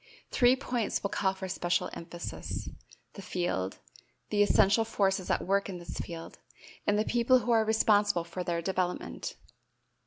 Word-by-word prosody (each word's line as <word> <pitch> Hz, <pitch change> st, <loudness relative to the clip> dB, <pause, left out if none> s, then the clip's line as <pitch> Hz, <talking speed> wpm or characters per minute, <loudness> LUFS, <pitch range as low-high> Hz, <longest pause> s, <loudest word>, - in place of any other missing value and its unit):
Three 245 Hz, 0 st, +5 dB
points 245 Hz, -4 st, -2 dB
will 200 Hz, -, -1 dB
call 190 Hz, -1 st, +1 dB
for 190 Hz, 0 st, -5 dB
special 175 Hz, -1 st, 0 dB
emphasis: 170 Hz, +1 st, -6 dB, 0.5 s
the 200 Hz, -, -9 dB
field, 175 Hz, -, -2 dB, 0.5 s
the 205 Hz, -1 st, +3 dB
essential 205 Hz, +1 st, +5 dB
forces 195 Hz, -4 st, 0 dB
at -, -, +1 dB
work 200 Hz, +1 st, +1 dB
in 185 Hz, -, -5 dB
this 175 Hz, -, -7 dB
field, 165 Hz, -1 st, -7 dB, 0.5 s
and 205 Hz, -, +3 dB
the 215 Hz, -, +1 dB
people 240 Hz, +2 st, +4 dB
who 245 Hz, -1 st, -1 dB
are 225 Hz, -1 st, +5 dB
responsible 205 Hz, -4 st, +3 dB
for 170 Hz, +2 st, -5 dB
their 170 Hz, -1 st, -2 dB
development. 185 Hz, -1 st, -2 dB
195 Hz, 155 wpm, -30 LUFS, 175-220 Hz, 0.5 s, Three